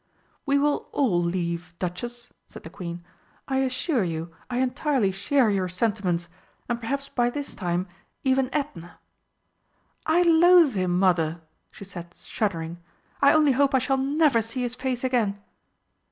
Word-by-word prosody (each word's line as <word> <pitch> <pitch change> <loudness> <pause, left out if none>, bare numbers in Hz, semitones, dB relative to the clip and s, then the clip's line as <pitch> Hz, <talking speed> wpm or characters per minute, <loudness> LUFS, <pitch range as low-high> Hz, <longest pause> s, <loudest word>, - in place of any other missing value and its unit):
"We 280 0 +3
will 290 +1 0
all 215 -12 +2
leave, 170 0 -3
Duchess," 240 +7 -5 0.2
said - - -12
the 160 - -9
Queen. 175 -1 -7 0.4
"I 265 - 0
assure 265 - 0
you 165 -1 -4 0.2
I 245 - -2
entirely 260 -4 +1
share 220 +5 +2
your 190 -2 0
sentiments, 180 -3 -1 0.4
and 240 -1 -2
perhaps 275 +4 -3
by 240 -1 +1
this 285 +3 -5
time 175 -1 -2 0.4
even 265 -1 +2
Edna 195 - -4 0.6
" - - -42
"I 355 - +5
loathe 340 -3 +6
him, 185 -3 0
Mother!" 170 -3 +2 0.3
she - - -12
said, 175 -2 -9
shuddering; 170 -5 -3 0.4
"I 280 0 +7
only 305 -2 +5
hope 275 +1 +3
I - - +6
shall 260 +1 +1
never 275 -2 +3
see 230 +3 -3
his 245 -1 -2
face 255 -1 -3
again!" 230 -6 0
235 Hz, 155 wpm, -25 LUFS, 180-270 Hz, 0.6 s, I